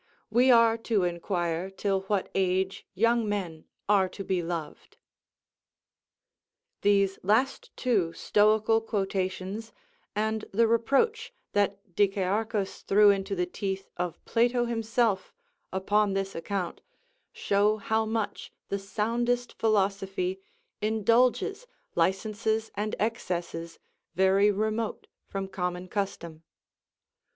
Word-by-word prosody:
we 245 +4 +4
are 230 -2 +6
to 220 -4 +1
inquire 175 0 -1
till 195 0 -1
what 205 -3 +1
age 190 0 0
young 230 +2 +2
men 175 -6 -3 0.2
are 195 -2 +4
to 195 - -7
be 185 -2 0
loved." 165 -2 -6 1.8
These 200 -1 +3
last 220 +8 +1
two 205 -10 +1
stoical 215 +3 +3
quotations, 195 0 -3 0.4
and 220 +1 -1
the 230 +4 +4
reproach 280 - +1 0.2
that 200 -1 +2 0.2
Dicæarchus 200 +1 0
threw 205 +1 +6
into 195 0 -1
the 180 -1 0
teeth 195 +1 -4
of 180 -1 -4
Plato 240 +1 +2
himself, 225 -3 0 0.4
upon 200 +2 +1
this 195 0 -2
account, 180 +1 -3 0.5
show 205 +2 +2
how 220 +1 0
much 220 -1 -3 0.2
the 200 - -1
soundest 235 +4 -1
philosophy 195 -3 0 0.4
indulges 230 - +2 0.3
licenses 220 - 0
and 210 +1 -2
excesses 175 -6 -3 0.4
very 190 +2 +4
remote 215 +2 -1 0.2
from 195 -1 -4
common 180 -1 -3
custom. 170 -5 -4
205 Hz, 105 wpm, -28 LUFS, 190-220 Hz, 1.8 s, are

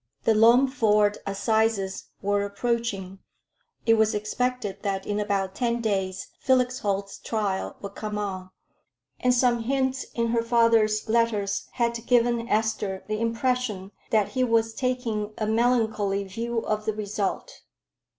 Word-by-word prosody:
The 225 - +4
Loamford 225 -3 +4
Assizes 200 0 0 0.2
were 205 0 +1
approaching; 200 -2 -2 0.7
it 225 - +5
was 220 -1 +3
expected 215 0 -2
that 195 -2 -2
in 205 0 -1
about 200 -2 -1
ten 235 +1 0
days 190 -4 -2
Felix 255 -1 +2
Holt's 200 -1 -2
trial 205 -4 -2
would 200 0 -7
come 210 0 -4
on, 190 -3 -4 0.7
and 250 - +3
some 245 -1 +3
hints 265 +1 0
in 230 -1 0
her 230 0 +2
father's 230 -2 +3
letters 220 -3 +1
had 235 -1 -1
given 235 -1 +2
Esther 215 -3 0
the 215 +1 -2
impression 230 -4 -1 0.2
that 215 -3 +2
he 255 -1 0
was 225 -2 +2
taking 230 -5 -2
a 215 - -1
melancholy 220 -3 +1
view 230 +4 -3
of 215 0 -1
the 220 - 0
result. 210 - -3
220 Hz, 135 wpm, -26 LUFS, 200-235 Hz, 0.7 s, it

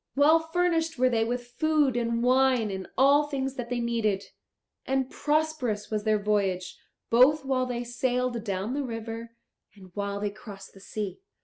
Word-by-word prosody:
Well 300 +4 +6
furnished 325 -1 0
were 255 +1 +3
they 225 -1 +2
with 245 +1 -4
food 305 -5 +2
and 235 -1 0
wine 255 -3 +3
and 190 -1 -5
all 285 +3 +5
things 270 -2 -2
that 245 -3 -6
they 245 -1 -1
needed; 225 -4 0 0.6
and 265 -1 -1
prosperous 295 -9 -1
was 210 0 -2
their 215 -1 +3
voyage, 200 -3 -1 0.4
both 270 +5 +5
while 255 -1 0
they 245 -1 -3
sailed 245 -1 -1
down 200 +2 -2
the 285 - -1
river 230 -2 -6 0.4
and 190 -3 -15
while 200 0 -3
they 205 0 -2
crossed 200 -2 -11
the 195 - -15
sea. 205 - -5
240 Hz, 170 wpm, -27 LUFS, 210-270 Hz, 0.6 s, Well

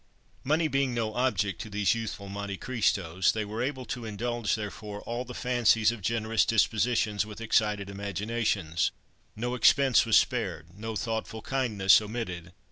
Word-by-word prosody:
Money 155 +4 +2
being 135 -3 0
no 110 -2 -1
object 105 -8 0
to 110 - -7
these 100 -1 +2
youthful 110 -3 -5
Monte 100 0 -5
Christos, 95 -8 +1
they 110 -1 -2
were 110 +3 -4
able 130 0 -3
to 120 -1 -5
indulge, 115 +1 -2
therefore, 105 0 -6
all 120 +2 -4
the 125 0 -9
fancies 115 -3 +3
of 120 -3 -7
generous 110 +1 +1
dispositions, 110 -1 +2
with 105 0 -9
excited 105 -3 +1
imaginations. 100 -3 -1 0.5
No 120 +3 -2
expense 130 +1 +5
was 115 -2 +5
spared; 90 -8 -1
no 110 +2 -5
thoughtful 110 0 -3
kindness 110 -8 +3
omitted. 95 -6 -5
110 Hz, 150 wpm, -28 LUFS, 100-120 Hz, 0.5 s, expense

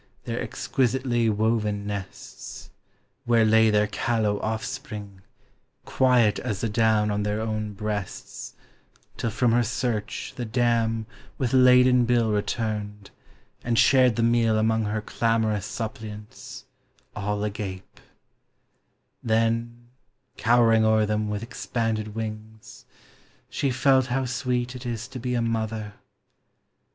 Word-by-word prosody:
289 - - -3
Their - - -2
exquisitely 125 -2 0
woven 105 -1 0
nests; 100 -2 -8 0.5
where 115 -2 +4
lay 110 0 +5
Their 105 0 +3
callow 105 -1 0
offspring, 105 -2 -5 0.6
quiet 125 -5 +3
as 105 -6 -3
the 115 - -1
down 110 -1 +2
On 105 0 -1
their 105 +1 -1
own 110 -1 -3
breasts, 105 -2 -5 0.6
till 115 - -2
from 115 +2 +1
her 120 +1 +4
search 115 -2 -3
the 125 - -4
dam 115 -1 +1 0.3
With 130 -1 -1
laden 125 -1 +6
bill 120 -2 +2
returned, 105 -1 -3 0.5
and 115 -1 0
shared 130 -3 +5
the 115 - 0
meal 115 -1 +3
Among 110 0 +1
her 105 +1 -2
clamorous 110 -3 0
suppliants, 110 +4 -7 0.5
all 105 0 -2
agape; 100 -3 -6 1.2
Then, 115 +1 -1 0.5
cowering 115 -1 +4
o'er 110 0 +3
them 105 0 -1
with 105 +1 -3
expanded 115 -3 -3
wings. 110 -1 -7 0.7
She 140 - 0
felt 130 0 +3
how 130 +1 -1
sweet 125 0 -2
it 125 - -8
is 120 -1 -4
to 130 -1 -7
be 125 +1 -2
a 120 - +1
mother. 110 -2 -2
110 Hz, 120 wpm, -25 LUFS, 105-120 Hz, 1.2 s, laden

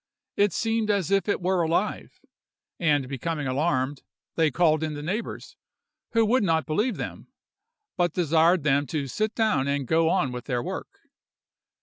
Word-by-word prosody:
It 205 -1 +3
seemed 225 -1 -1
as 200 -3 +1
if 195 -1 +2
it - - +1
were 185 0 +2
alive, 170 +5 -1 0.6
and 145 -6 +2
becoming 145 +3 -3
alarmed, 135 0 0 0.3
they 160 -2 +3
called 155 +1 +2
in 155 -1 -2
the 145 - -6
neighbors, 200 +9 -5 0.6
who 225 -1 +4
would 245 +4 +3
not 165 -4 +1
believe 210 +11 0
them; - - -6 0.7
but 175 -2 +1
desired 165 0 +3
them 145 -1 +2
to 145 +1 -2
sit 215 - -2
down 215 - +1
and 140 -1 -1
go 160 +4 +2
on 165 -8 +1
with 125 0 -6
their 120 -3 -1
work. - - -7
165 Hz, 160 wpm, -26 LUFS, 145-195 Hz, 0.7 s, who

